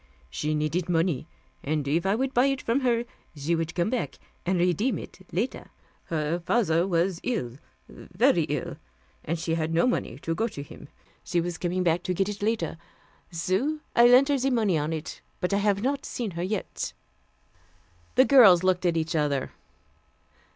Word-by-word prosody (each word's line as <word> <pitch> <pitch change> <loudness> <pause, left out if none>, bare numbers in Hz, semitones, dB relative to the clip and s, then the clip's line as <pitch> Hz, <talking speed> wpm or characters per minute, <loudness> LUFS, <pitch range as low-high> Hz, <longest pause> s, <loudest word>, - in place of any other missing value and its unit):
She 150 - -1
needed 155 +4 -1
money, 165 -3 0 0.4
and 150 -1 -1
if 165 +6 +1
I 195 - +3
would 265 +3 -1
buy 250 +3 +4
it 270 -1 0
from 235 +2 0
her, 240 -3 +1 0.3
she 150 +3 -1
would 165 0 -2
come 175 +5 0
back 250 - -2 0.3
and 185 0 +2
redeem 180 +8 +1
it - - -10
later. 220 +9 -3 0.4
Her 160 +1 -1
father 175 -2 +1
was 175 0 +1
ill, 150 - -3 0.3
very - - +1
ill, - - -4 0.5
and 165 +3 -2
she 165 0 -2
had 160 -1 -1
no 170 - +4
money 245 - -1
to 165 - -1
go 220 +7 0
to 145 -10 -7
him. 145 - -12 0.4
She 175 - 0
was 170 0 -3
coming 180 +1 -1
back 170 0 +2
to 180 0 -2
get 195 +3 0
it 205 -1 -6
later. 205 -7 -1 0.5
So 190 - -1 0.2
I 235 0 +7
lent 255 +3 +6
her 280 -1 +2
the 265 +2 +1
money 220 -8 +2
on 150 +1 -1
it 160 -1 -5 0.2
but 180 +2 -1
I - - +3
haf 200 0 +1
not 280 +2 0
seen 230 -5 -4
her 170 0 -5
yet." 190 +3 -3 1.2
The 260 - +6
girls 215 -11 +7
looked 185 -1 +2
at 170 -1 +1
each 165 +1 -1
other. 145 -3 0
180 Hz, 185 wpm, -26 LUFS, 165-230 Hz, 1.2 s, I